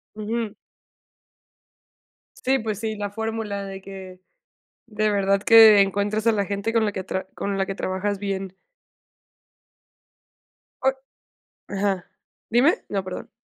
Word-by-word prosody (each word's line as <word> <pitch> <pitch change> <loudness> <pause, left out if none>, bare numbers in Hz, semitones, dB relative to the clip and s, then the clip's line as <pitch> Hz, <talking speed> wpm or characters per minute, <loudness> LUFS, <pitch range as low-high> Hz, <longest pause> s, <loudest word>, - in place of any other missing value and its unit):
Ujú. 215 0 -3 1.8
Sí, 265 +1 +1
pues 215 -4 -3
sí, 220 -1 -3
la 205 -1 -3
fórmula 220 -2 -3
de 195 0 -7
que 190 -1 -10 0.7
de 215 -1 0
verdad 200 -1 +2
que 220 -2 +8
encuentras 205 +3 0
a - - +6
la 205 -2 0
gente 200 +3 -2
con 225 -1 +3
la 210 - 0
que 190 -2 -5 0.3
con 200 -1 -2
la 195 - +1
que 195 - -5
tra - - -9
trabajas 195 +2 -2
bien. 195 -2 -4 2.3
O 265 - +4 0.8
ajá. 195 -2 -1 0.4
¿Dime? 255 - +3
No, 195 -2 -1
perdón. 185 0 -7
205 Hz, 130 wpm, -24 LUFS, 195-220 Hz, 2.3 s, que